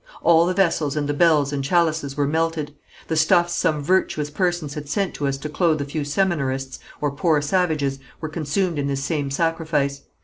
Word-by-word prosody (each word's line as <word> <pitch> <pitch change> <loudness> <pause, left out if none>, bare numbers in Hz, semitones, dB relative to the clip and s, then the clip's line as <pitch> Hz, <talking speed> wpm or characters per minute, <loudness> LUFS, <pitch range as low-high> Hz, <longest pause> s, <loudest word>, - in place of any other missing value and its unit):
All 170 0 +5
the 185 - 0
vessels 165 -6 +1
and 145 -1 -1
the 145 - 0
bells 150 -2 +3
and 140 -1 -2
chalices 155 -3 +1
were 145 - +2
melted; 160 0 -1 0.3
the 160 - -1
stuffs 175 +2 +3
some 155 -4 0
virtuous 150 -3 +1
persons 175 -3 -1
had 145 -1 -7
sent 195 +1 -1
to 145 - -2
us 135 0 -1
to 140 - -6
clothe 155 0 +1
a 140 - -2
few 145 +1 -3
seminarists, 140 -5 -1 0.2
or 145 -1 0
poor 150 +2 +2
savages, 145 -4 0 0.2
were 155 - -4
consumed 160 +2 -1
in 140 - -1
this 135 -1 -2
same 145 -1 -1
sacrifice. 150 -2 -1
150 Hz, 195 wpm, -22 LUFS, 140-170 Hz, 0.3 s, All